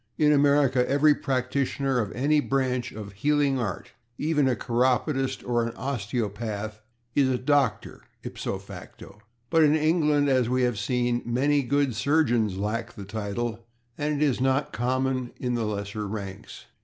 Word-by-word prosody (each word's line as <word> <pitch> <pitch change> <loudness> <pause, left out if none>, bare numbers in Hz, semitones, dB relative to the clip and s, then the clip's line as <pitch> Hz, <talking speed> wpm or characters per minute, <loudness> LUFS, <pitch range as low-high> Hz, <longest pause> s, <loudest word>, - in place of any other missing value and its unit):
In 150 -1 +4
America 140 -3 +3
every 145 +2 +5
practitioner 135 0 -1
of 105 -4 -2
any 145 +6 +2
branch 130 -3 -1
of 105 -2 -8
the - - -15
healing 145 +1 +2
art, 100 -7 -4 0.3
even 150 -2 +1
a 130 - +2
chiropodist 130 +3 0
or 120 -1 +1
an 115 0 -4
osteopath, 110 -3 -3 0.3
is 135 -2 +3
a 130 - +1
doctor 135 -3 0 0.2
/ipso - - -4
facto/, 105 - -12 0.3
but 165 -1 +5
in 150 0 +5
England, 150 -2 +2
as 130 -3 +2
we 130 0 +1
have 120 -4 0
seen, 120 +3 0
a - - -3
good - - -14 0.6
many - - -5
surgeons 120 -5 +1
lack 110 +3 -3
the 100 - -9
title 110 +3 -4 0.3
and 150 -1 -1
it 150 - +3
is 130 -3 0
not 135 +2 +1
common 130 +2 -1
in 125 -1 -1
the 115 -2 -1
lesser 105 0 -4
ranks. 100 -2 -7
125 Hz, 160 wpm, -26 LUFS, 110-140 Hz, 0.6 s, every